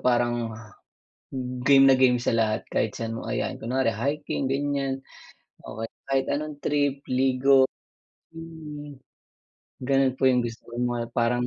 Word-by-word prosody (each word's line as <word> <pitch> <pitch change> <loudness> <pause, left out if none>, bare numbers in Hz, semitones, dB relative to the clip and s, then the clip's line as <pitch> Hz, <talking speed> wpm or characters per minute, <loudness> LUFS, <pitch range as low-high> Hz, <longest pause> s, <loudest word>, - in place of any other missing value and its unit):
parang 120 -1 +1 1.2
game 135 -1 +7
na 135 - +7
game 130 -1 +4
sa 120 - -1
lahat 110 -1 +1
kahit 110 - 0
saan 115 -1 -3
mo 115 - -6
ayain, - - -2
kunware 125 0 0
hiking, 140 +4 -2
ganiyan 135 -1 -1 0.6
o 110 +1 -6 0.2
kahit 135 -1 +2
anong 150 0 -3
trip, 145 -1 0
ligo, 130 +1 +3 0.6
swimming. 150 -4 -9 0.9
Ganun 135 -1 +3
po 130 - +3
yung 125 -1 +4
gusto 115 -1 -6
ko 120 - -11
mga 120 -1 -1
parang 120 +1 +1
130 Hz, 135 wpm, -26 LUFS, 120-140 Hz, 1.2 s, game